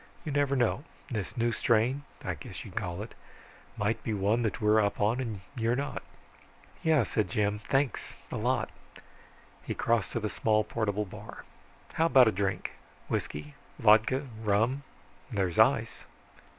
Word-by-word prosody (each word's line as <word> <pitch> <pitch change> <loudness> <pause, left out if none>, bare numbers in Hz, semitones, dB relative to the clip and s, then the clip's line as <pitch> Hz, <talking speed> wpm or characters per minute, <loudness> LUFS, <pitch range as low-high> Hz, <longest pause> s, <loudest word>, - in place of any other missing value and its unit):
You 155 - -2
never 140 -1 +2
know, 125 +2 +1 0.3
this 110 +2 -3
new 120 0 +2
strain 120 +5 +2 0.2
I - - 0
guess - - -8
you'd - - -11
call 90 +3 -3
it 115 - -10 0.6
might 105 +2 0
be 110 - -1
one 105 +4 +2
that 115 +1 -1
we're 105 0 +4
up 100 - -1
on 110 +5 +2
and 110 -7 -3
you 115 -2 0
aren't." 140 - -3 0.8
"Yeah," 160 -3 +4
Jim 105 -1 0
said. 105 - -16
"Thanks 135 -1 0 0.2
a - - -3
lot." 120 +1 0 0.9
He - - -4
crossed 115 -3 +1
to - - 0
the 110 - -1
small 110 0 +2
portable 105 -1 -1
bar. 90 - -10 0.5
"How 165 - +3
about 130 -6 +7
a - - +4
drink? 100 -1 -1 0.4
Whisky, 75 0 -3 0.2
vodka, 115 +6 +4 0.2
rum 110 +6 +2 0.5
there's 95 -6 0
ice." - - +3
110 Hz, 155 wpm, -30 LUFS, 105-125 Hz, 0.9 s, about